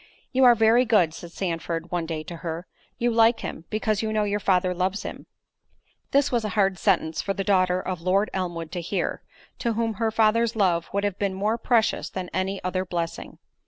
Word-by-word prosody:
"You 260 0 +4
are 240 -1 +8
very 225 +2 +5
good," 210 -9 +3
said 170 +1 -9
Sandford, 170 -2 -3
one 175 -2 -1
day 160 -2 -4
to 170 +2 -8
her; 165 +1 -5 0.3
"you 240 0 +1
like 230 +1 +4
him, 160 - -6
because 215 -1 0
you 220 -1 -2
know 215 -1 +1
your 205 0 0
father 185 -2 +2
loves 185 +3 -1
him." - - -8 0.8
This 280 0 +2
was 240 -3 +1
a 215 - -2
hard 195 -3 +2
sentence 170 -5 +1
for 195 - -2
the 195 - -2
daughter 185 -2 +2
of 185 -2 -4
Lord 190 +4 +1
Elmwood 175 -4 -3
to 180 - -3
hear, 180 +2 -2 0.4
to 235 -2 0
whom 225 0 -1
her 225 - +3
father's 225 +1 +2
love 175 -5 +1
would 200 +1 -1
have 200 -2 -2
been 195 -2 -1
more 215 +4 0
precious 230 -1 +1
than 185 -2 -6
any 190 +1 -1
other 185 0 -1
blessing. 170 -2 -4
195 Hz, 205 wpm, -25 LUFS, 175-220 Hz, 0.8 s, are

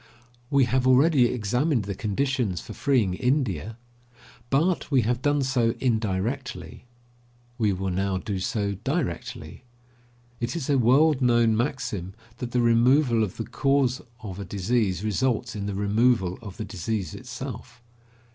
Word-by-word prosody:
We 140 -1 +4
have 130 +1 +1
already 130 +1 +5
examined 125 +3 0
the 100 0 -4
conditions 110 - -1
for - - -9
freeing 130 -9 +1
India, 115 - -1 0.7
but 165 +6 +1
we 135 -4 +3
have 120 +3 0
done 145 0 +2
so 125 -3 +1
indirectly; 110 - -2 0.7
we 105 -3 +2
will 95 0 -2
now 95 +1 0
do 95 +1 -3
so 100 +1 -1
directly. 105 - -3 0.8
It 120 +5 -3
is 145 -4 -2
a 135 - +3
world 135 +4 +4
known 120 -3 +4
maxim 110 -7 -3 0.2
that 125 - -4
the 125 0 +1
removal 120 +1 +4
of 100 - -4
the 115 - -3
cause 135 -3 +1 0.2
of 95 -2 -6
a - - -4
disease 100 0 -1
results 115 +1 0
in 100 -1 -4
the 100 - -3
removal 100 -2 +1
of 100 -3 -9
the 110 - -4
disease 105 0 -3
itself. 125 -1 -8
120 Hz, 145 wpm, -25 LUFS, 100-130 Hz, 0.8 s, already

